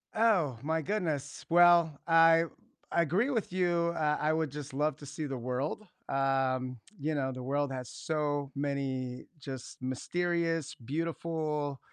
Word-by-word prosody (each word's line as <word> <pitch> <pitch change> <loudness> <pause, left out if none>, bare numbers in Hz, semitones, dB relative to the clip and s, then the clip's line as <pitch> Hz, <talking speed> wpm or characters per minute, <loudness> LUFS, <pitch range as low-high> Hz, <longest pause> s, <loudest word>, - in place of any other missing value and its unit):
Oh, 190 - +3
my 160 +2 0
goodness, 160 -7 -2
well, 170 -3 +6
I 165 0 +6 0.5
I 170 - +4
agree 185 - +1
with 225 -9 -1
you, 175 -2 +2
uh, 150 -2 +1
I 155 +1 +2
would 160 -1 0
just 145 0 -7
love 150 +1 0
to 145 - -11
see 145 +2 -4
the 135 -2 -3
world, 125 - -2 0.3
um, 130 -2 +1 0.2
you 155 +3 -1
know, 135 -3 0
the 130 -1 -6
world 140 +2 0
has 130 -2 -4
so 145 -3 -2
many 135 -3 -2
just 135 -3 -8
mysterious, 165 +3 -1
beautiful, 150 0 -2
150 Hz, 145 wpm, -31 LUFS, 135-165 Hz, 0.5 s, well